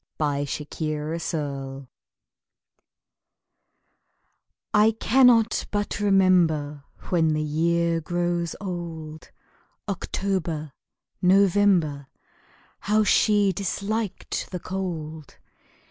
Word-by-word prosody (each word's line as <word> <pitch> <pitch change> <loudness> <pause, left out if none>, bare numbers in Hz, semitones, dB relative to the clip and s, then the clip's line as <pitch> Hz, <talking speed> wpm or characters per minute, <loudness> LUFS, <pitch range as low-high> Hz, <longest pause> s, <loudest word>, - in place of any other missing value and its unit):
When 145 -2 0
the 150 +1 -4
Year 155 -1 -2
Grows 165 +1 -3
Old 140 -3 -4 3.0
I 215 +1 +4
cannot 235 -3 +4
but 205 0 -2
remember 175 -8 +2 0.2
When 165 -3 +2
the 155 - -1
year 165 +2 +1
grows 175 0 -2
old 165 -5 -7 0.6
October 180 -6 -3 0.5
November 185 -6 +3 0.7
How 215 +2 +2
she 205 -2 +3
disliked 200 +3 -3
the 180 - -5
cold! 160 -6 -6
170 Hz, 80 wpm, -25 LUFS, 155-200 Hz, 3.0 s, I